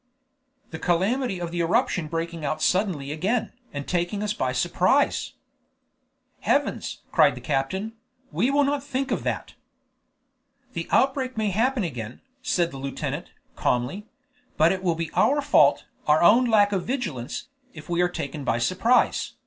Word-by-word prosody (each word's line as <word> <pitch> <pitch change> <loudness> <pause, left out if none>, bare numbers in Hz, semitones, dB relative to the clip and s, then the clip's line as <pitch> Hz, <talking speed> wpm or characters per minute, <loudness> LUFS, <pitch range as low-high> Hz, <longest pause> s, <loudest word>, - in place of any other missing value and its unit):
"The 160 - -6
calamity 195 +6 0
of 170 -1 -4
the 175 - -3
eruption 170 0 +1
breaking 165 0 -4
out 155 +2 -1
suddenly 175 -6 0
again, 205 +9 -1 0.2
and 145 -1 -6
taking 180 +3 -1
us 210 0 -1
by 130 -11 -1
surprise." 125 - +1 1.1
"Heavens!" - - -1
cried - - +4
the - - -7
captain, 190 +11 -2 0.4
"we 185 - +1
will 285 +1 +3
not 280 0 0
think 270 -1 -3
of - - 0
that." - - -3 1.2
"The - - -4
outbreak 265 -2 +1
may 215 -2 0
happen 240 +4 +1
again," 120 -8 -5 0.2
said 175 -8 0
the 135 - -8
lieutenant, 135 0 -4 0.3
calmly; 125 - -1 0.5
"but 160 +2 +5
it 190 -1 -2
will 175 -3 +1
be 165 -1 -4
our 290 +2 +3
fault, 290 0 +4 0.2
our 150 +2 +4
own 235 +8 +6
lack 210 -3 +4
of 190 -3 0
vigilance, 185 - -4 0.3
if 155 -1 -10
we 175 0 0
are 175 - +3
taken 145 -3 -5
by 120 -3 +1
surprise." 185 - +2
180 Hz, 155 wpm, -25 LUFS, 155-230 Hz, 1.2 s, own